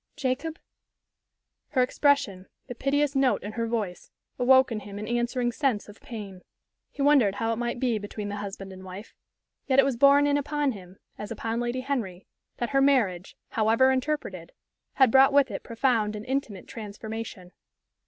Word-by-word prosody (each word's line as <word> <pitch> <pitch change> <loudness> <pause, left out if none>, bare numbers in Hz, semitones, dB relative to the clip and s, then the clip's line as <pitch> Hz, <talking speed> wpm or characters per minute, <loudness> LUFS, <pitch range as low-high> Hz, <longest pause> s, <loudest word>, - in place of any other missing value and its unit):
"Jacob?" 280 +5 -2 1.2
Her 255 -3 +4
expression, 260 -8 +1 0.2
the 245 - -7
piteous 280 +3 0
note 270 -2 +2
in 205 - -5
her 230 +1 -2
voice, 215 -6 -3 0.3
awoke 260 +1 +5
in 220 - -2
him 205 -1 -9
an 210 +1 -5
answering 240 +1 0
sense 245 -4 -1
of 205 +1 -14
pain. 200 -6 -8 0.5
He 280 - -4
wondered 270 -9 +4
how 225 +2 -1
it - - -4
might 240 0 -2
be 240 -4 +1
between 205 0 -6
the 205 0 -4
husband 195 -1 -7
and 185 0 -11
wife. 190 +4 -9 0.5
Yet 265 -1 +2
it 275 - +7
was 270 -3 -1
borne 280 +2 +6
in 290 0 +2
upon 290 0 0
him, 190 -4 -11 0.2
as 210 - -6
upon 225 +1 -3
Lady 240 +1 -2
Henry, 225 -10 -3 0.3
that 240 - -3
her 275 -1 +3
marriage, 220 -10 +1
however 225 +4 +3
interpreted, 255 - -3 0.4
had 265 -4 +4
brought 270 +2 +6
with 280 -4 +4
it 195 - -5
profound 230 -3 0
and 210 +1 -7
intimate 260 -8 -3
transformation. 215 -3 -7
235 Hz, 175 wpm, -27 LUFS, 205-270 Hz, 1.2 s, it